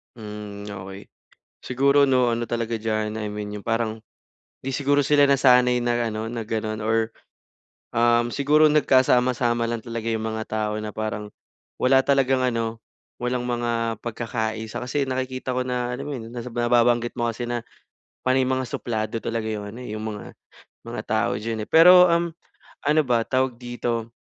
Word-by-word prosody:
Hmm, 105 Hz, -2 st, -8 dB
okey. 95 Hz, 0 st, -9 dB, 0.5 s
Siguro 140 Hz, +3 st, +3 dB
'no 130 Hz, -2 st, +3 dB
ano 120 Hz, 0 st, 0 dB
talaga 115 Hz, -1 st, -2 dB
diyan, 110 Hz, -1 st, -2 dB
I 105 Hz, -1 st, -4 dB
mean 105 Hz, 0 st, -5 dB
yung 100 Hz, -, -9 dB
parang 115 Hz, -1 st, -1 dB, 0.6 s
hindi 135 Hz, 0 st, -5 dB
siguro 145 Hz, +1 st, +2 dB
sila 145 Hz, -1 st, +4 dB
nasanay 125 Hz, -2 st, +5 dB
na 120 Hz, -1 st, 0 dB
ano 110 Hz, 0 st, -4 dB
na 115 Hz, 0 st, -4 dB
gano'n 110 Hz, 0 st, -3 dB
or, 110 Hz, +1 st, 0 dB, 0.8 s
um, 120 Hz, 0 st, +3 dB
siguro 150 Hz, +4 st, +4 dB
nagkasama-sama 125 Hz, -4 st, +3 dB
lang 115 Hz, -1 st, -3 dB
talaga 115 Hz, -2 st, -5 dB
yung 110 Hz, -1 st, -1 dB
mga 110 Hz, 0 st, -4 dB
tao 110 Hz, -1 st, -2 dB
na 105 Hz, -1 st, -6 dB
parang 110 Hz, -1 st, -3 dB, 0.5 s
wala 135 Hz, +1 st, +5 dB
talagang 135 Hz, -2 st, +3 dB
ano, 115 Hz, -2 st, -1 dB, 0.4 s
walang 125 Hz, 0 st, -1 dB
mga 120 Hz, -2 st, -1 dB
pagkakaisa. 110 Hz, -1 st, -3 dB
Kasi 140 Hz, +3 st, 0 dB
nakikita 130 Hz, 0 st, -3 dB
ko 130 Hz, -, 0 dB
na 125 Hz, -1 st, -1 dB
alam -, -, -6 dB
mo 145 Hz, -, -4 dB
yun, 115 Hz, -2 st, -7 dB
nababanggit 120 Hz, 0 st, +1 dB
mo 120 Hz, -, +1 dB
kasi 115 Hz, +1 st, -3 dB
na 120 Hz, -1 st, -3 dB, 0.6 s
panay 130 Hz, 0 st, +2 dB
mga 130 Hz, -1 st, -1 dB
suplado 110 Hz, -2 st, -3 dB
talaga 115 Hz, -1 st, -2 dB
yung 105 Hz, -2 st, -4 dB
ano 115 Hz, -, -10 dB
eh 105 Hz, -, -5 dB
yung 110 Hz, -, -5 dB
mga 110 Hz, -2 st, -7 dB, 0.5 s
mga -, -, -5 dB
tao -, -, +1 dB
diyan 110 Hz, 0 st, -3 dB
eh. -, -, -34 dB
Pero, 180 Hz, +3 st, +9 dB
um, 170 Hz, 0 st, +2 dB, 0.6 s
ano 155 Hz, +1 st, +5 dB
ba, 120 Hz, -2 st, +2 dB
tawag 130 Hz, -2 st, 0 dB
dito, 120 Hz, -1 st, -3 dB
120 Hz, 165 wpm, -24 LUFS, 110-130 Hz, 0.8 s, Pero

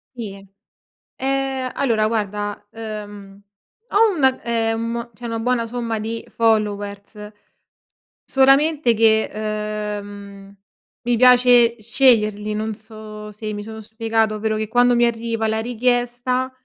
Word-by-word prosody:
Sì. 200 Hz, -5 st, -7 dB, 0.7 s
Eh, 270 Hz, -1 st, -1 dB
allora 225 Hz, -5 st, +1 dB
guarda, 205 Hz, -1 st, -3 dB
uhm, 205 Hz, -3 st, -8 dB, 0.5 s
ho 420 Hz, -1 st, +3 dB
una 265 Hz, -4 st, +2 dB
ehm, 230 Hz, +1 st, -2 dB
cioè 240 Hz, +3 st, -11 dB
una 230 Hz, -1 st, -3 dB
buona 240 Hz, 0 st, 0 dB
somma 230 Hz, -1 st, -3 dB
di 225 Hz, +1 st, -5 dB
followers, 210 Hz, -2 st, -1 dB, 0.9 s
solamente 275 Hz, 0 st, +3 dB
che, 220 Hz, 0 st, +3 dB, 0.7 s
uhm, 200 Hz, -1 st, -12 dB, 0.5 s
mi 240 Hz, 0 st, +1 dB
piace 245 Hz, -1 st, +6 dB
sceglierli, 215 Hz, -3 st, +2 dB
non 215 Hz, 0 st, -3 dB
so 215 Hz, -1 st, -10 dB
se 215 Hz, +1 st, -6 dB
mi 205 Hz, 0 st, -5 dB
sono 220 Hz, +1 st, -8 dB
spiegata. 220 Hz, 0 st, -1 dB
Ovvero 215 Hz, 0 st, -1 dB
che 215 Hz, 0 st, -3 dB
quando 245 Hz, +2 st, +4 dB
mi 240 Hz, 0 st, +3 dB
arriva 230 Hz, -1 st, -1 dB
la 220 Hz, 0 st, 0 dB
richiesta, 245 Hz, +2 st, 0 dB
225 Hz, 120 wpm, -21 LUFS, 215-245 Hz, 0.9 s, piace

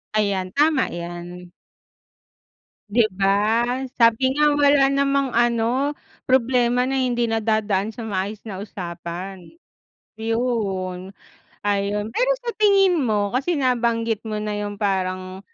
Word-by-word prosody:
Ayan. 195 Hz, -3 st, 0 dB
Tama 295 Hz, -2 st, +3 dB
'yan. 175 Hz, +1 st, -8 dB, 1.4 s
'Di 225 Hz, +2 st, +4 dB
ba? 195 Hz, +1 st, +1 dB, 0.7 s
Sabi 230 Hz, +3 st, +4 dB
nga 300 Hz, +1 st, +3 dB
wala 285 Hz, -1 st, +5 dB
namang 275 Hz, 0 st, +1 dB
ano, 240 Hz, +4 st, +1 dB, 0.3 s
problema 250 Hz, 0 st, +2 dB
na 270 Hz, -, 0 dB
hindi 240 Hz, -2 st, 0 dB
nadadaan 215 Hz, -2 st, 0 dB
sa 235 Hz, -, -8 dB
maayos 205 Hz, -1 st, -3 dB
na 190 Hz, -, -6 dB
usapan. 180 Hz, 0 st, -7 dB, 0.7 s
'Yon. 210 Hz, -5 st, -2 dB, 0.5 s
Ayun, 205 Hz, +1 st, -1 dB
pero -, -, +1 dB
sa 470 Hz, -, -2 dB
tingin 390 Hz, -4 st, +4 dB
mo, 210 Hz, -5 st, 0 dB
kasi 280 Hz, +7 st, 0 dB
nabanggit 235 Hz, -4 st, 0 dB
mo 215 Hz, -, -3 dB
na 210 Hz, 0 st, -3 dB
yung 205 Hz, 0 st, -4 dB
parang, 185 Hz, -2 st, -2 dB
225 Hz, 115 wpm, -22 LUFS, 195-260 Hz, 1.4 s, wala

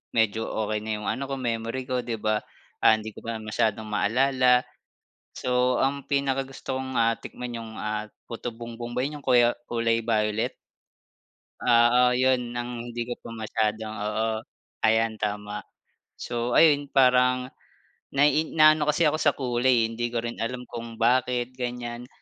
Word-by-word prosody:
medyo 110 Hz, 0 st, +1 dB
okey 110 Hz, -1 st, -2 dB
na 110 Hz, +1 st, -5 dB
'yong 105 Hz, -, -6 dB
ano 135 Hz, -, -2 dB
ko 135 Hz, -, -3 dB
memory 115 Hz, 0 st, -3 dB
ko 125 Hz, 0 st, -2 dB
'di 120 Hz, -1 st, -3 dB
ba, 110 Hz, 0 st, 0 dB, 0.4 s
ah, -, -, +6 dB
hindi 110 Hz, 0 st, -6 dB
ko -, -, -12 dB
masyadong 110 Hz, -1 st, -1 dB
maalala. 125 Hz, +4 st, +3 dB, 0.7 s
So 125 Hz, 0 st, +1 dB
ang 140 Hz, +1 st, -1 dB
pinakagusto 135 Hz, -1 st, -2 dB
kong, 130 Hz, 0 st, -5 dB
ah, 115 Hz, -1 st, +3 dB
tikman 125 Hz, -1 st, -7 dB
'yong 115 Hz, -1 st, -8 dB
ah, 105 Hz, 0 st, -3 dB, 0.2 s
putubongbong 120 Hz, 0 st, -6 dB
ba 125 Hz, -, 0 dB
'yong 145 Hz, +1 st, -4 dB
kuya 120 Hz, -1 st, +5 dB, 0.2 s
kulay 115 Hz, -1 st, +1 dB
violet. 105 Hz, -1 st, 0 dB, 1.1 s
Oo, 120 Hz, 0 st, +5 dB
yun 125 Hz, -2 st, +1 dB
ang 120 Hz, 0 st, -4 dB
hindi 120 Hz, 0 st, -3 dB
ko 120 Hz, -, -5 dB
pa -, -, -10 dB
masyadong, 110 Hz, -1 st, -2 dB
oo. 105 Hz, +2 st, -1 dB, 0.6 s
Ayan 110 Hz, 0 st, +3 dB
tama. 105 Hz, 0 st, -3 dB, 0.6 s
So 120 Hz, 0 st, -3 dB
ayun 145 Hz, -3 st, +5 dB
parang. 125 Hz, -1 st, +3 dB, 0.6 s
Nai 150 Hz, +3 st, +3 dB
naano 155 Hz, -1 st, +6 dB
kasi 150 Hz, +3 st, +3 dB
ako 155 Hz, 0 st, +3 dB
sa 145 Hz, -, +3 dB
kulay 125 Hz, -2 st, +2 dB
eh, -, -, +2 dB
hindi 120 Hz, +1 st, -2 dB
ko 120 Hz, -1 st, -2 dB
rin 120 Hz, 0 st, -5 dB
alam 125 Hz, +2 st, -3 dB
kung 115 Hz, -1 st, -8 dB
bakit 125 Hz, +1 st, +1 dB
ganyan. 125 Hz, -1 st, -5 dB
120 Hz, 150 wpm, -26 LUFS, 110-130 Hz, 1.1 s, ah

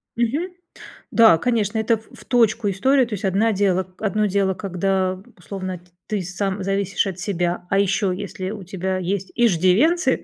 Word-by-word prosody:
Мгм. 260 Hz, +10 st, 0 dB, 0.6 s
Да, 225 Hz, -8 st, +6 dB
конечно, 225 Hz, 0 st, 0 dB
это 225 Hz, +1 st, +2 dB
в 220 Hz, -, -20 dB
в -, -, -15 dB
точку 230 Hz, -3 st, +2 dB
история. 260 Hz, +8 st, +3 dB
То 230 Hz, -, -7 dB
есть 200 Hz, -1 st, -3 dB
одна 200 Hz, +4 st, +2 dB
дело 190 Hz, -2 st, +1 dB
одно 210 Hz, 0 st, 0 dB
дело, 195 Hz, -1 st, +1 dB
когда 190 Hz, 0 st, -1 dB, 0.2 s
условно 185 Hz, 0 st, -6 dB
т 175 Hz, -, -25 dB, 0.2 s
ты 210 Hz, -2 st, -1 dB
сам 195 Hz, +2 st, -3 dB
зависишь 195 Hz, +1 st, 0 dB
от 185 Hz, -2 st, -5 dB
себя. 180 Hz, -2 st, -2 dB
А 195 Hz, -, +2 dB
еще, 195 Hz, -1 st, +1 dB
если 190 Hz, -1 st, -5 dB
у 210 Hz, -3 st, -7 dB
тебя 185 Hz, +1 st, -3 dB
есть 185 Hz, +1 st, -3 dB
иждивенцы, 235 Hz, -, +3 dB
195 Hz, 170 wpm, -22 LUFS, 185-220 Hz, 0.6 s, Да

